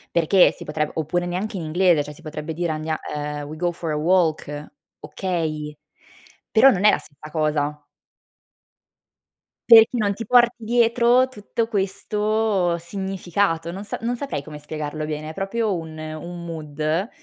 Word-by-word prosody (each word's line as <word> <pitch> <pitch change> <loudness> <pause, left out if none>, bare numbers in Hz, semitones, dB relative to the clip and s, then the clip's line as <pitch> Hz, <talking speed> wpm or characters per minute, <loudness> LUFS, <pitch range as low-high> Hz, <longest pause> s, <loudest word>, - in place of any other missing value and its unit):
Perché 170 +3 +5
si - - -11
potre 150 0 -2
oppure 165 +3 -1
neanche 185 +3 -3
in 170 - -4
inglese 170 0 +3
cioè 150 +1 -9
si 155 - -16
potrebbe 155 0 -6
dire 170 0 -1
andia 155 0 -3 0.2
uhm, 150 0 -4
we 155 - -7
go 175 +2 0
for 170 -1 -6
a 150 - 0
walk, 165 -1 +2 0.5
okay, 155 -5 -3 0.8
però 250 +5 +7
non 205 -4 +1
è 210 - +8
la - - +1
stessa 150 +1 -13
cosa. 150 -2 -1 1.9
Perché 225 -1 +10
non 205 -2 +1
ti 230 +3 -6
porti 240 +1 +4
dietro 240 +2 +4
tutto 225 -1 -3
questo 210 -2 0
significato 180 -2 -2
non 195 +3 -7
sa - - -4
non 240 +2 -1
saprei 270 - -4
come 150 0 -9
spiegarlo 150 0 -5
bene, 155 0 -4
è 160 - -7
proprio 205 +3 -1
un 160 -1 -8
un 155 +3 -7
mood. 155 +4 -2
170 Hz, 155 wpm, -23 LUFS, 155-205 Hz, 1.9 s, Perché